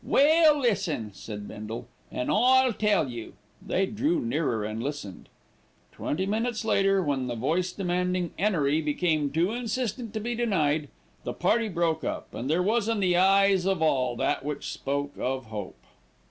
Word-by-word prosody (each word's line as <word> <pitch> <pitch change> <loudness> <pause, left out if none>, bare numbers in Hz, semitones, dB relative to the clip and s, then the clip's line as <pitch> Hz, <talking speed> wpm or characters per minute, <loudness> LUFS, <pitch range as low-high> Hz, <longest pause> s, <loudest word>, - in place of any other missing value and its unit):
"Well, 310 +1 +5
listen," 195 - 0
said 105 0 -8
Bindle, 115 +3 -7 0.2
"an' 125 - -2
I'll 255 +2 +4
tell 210 -8 +2
you." 120 -3 -7 0.3
They 195 - +1
drew 285 - 0
nearer 155 - -1
and 110 +1 -4
listened. 140 -9 -6 0.6
Twenty 185 +6 -2
minutes 220 +2 -1
later, 195 -2 +3
when 135 -4 -1
the 120 - -3
voice 170 +10 0
demanding 180 -2 -1
'Enery 160 -6 +1
became 155 -1 0
too 165 +7 +1
insistent 240 -1 -3
to - - 0
be 235 +3 -3
denied, 160 -11 +1 0.4
the - - -3
party 220 +5 +1
broke 165 -3 0
up, - - -4
and 130 - -4
there 170 +4 +2
was 220 +2 +1
in 225 -2 0
the 180 -3 +2
eyes 195 0 +4
of 190 -4 +1
all 130 -5 +1
that 120 - 0
which 150 0 -4
spoke 140 +1 -2
of 130 0 -2
hope. 105 -4 -7
180 Hz, 160 wpm, -27 LUFS, 140-215 Hz, 0.6 s, Well